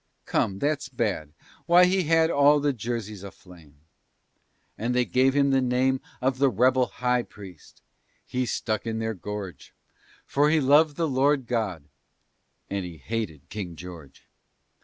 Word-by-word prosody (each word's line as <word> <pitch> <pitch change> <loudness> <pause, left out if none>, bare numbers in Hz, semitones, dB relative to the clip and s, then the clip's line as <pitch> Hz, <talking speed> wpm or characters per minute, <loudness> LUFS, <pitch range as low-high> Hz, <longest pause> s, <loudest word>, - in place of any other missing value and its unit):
Come 95 - 0
that's 145 +3 -1
bad; 105 - -2 0.4
why 175 +1 +7
he 185 0 +1
had 165 +1 +3
All 145 +1 +5
the 145 0 +1
Jerseys 110 -4 -5
aflame. 85 -7 -14 0.9
And 120 +3 -2
they 125 0 +2
gave 130 +2 +2
him 140 -1 +3
the 135 0 +3
name 130 +1 +1 0.2
Of 130 0 0
the 140 -1 +4
"rebel 130 +1 +3
high 125 0 0
priest." 95 -8 -14 0.4
He 125 -1 -2
stuck 110 -1 -2
in 110 0 -2
their 110 0 -2
gorge, 100 -1 -8 0.5
For 145 +2 +2
he 160 +1 +3
loved 145 +2 +4
the 165 -1 0
Lord 135 0 +2
God, 110 - -2 0.8
and 100 -1 -3
he 85 -2 -8
hated 85 -6 -5
King 95 -5 -6
George! 80 -4 -11
125 Hz, 150 wpm, -26 LUFS, 100-140 Hz, 0.9 s, why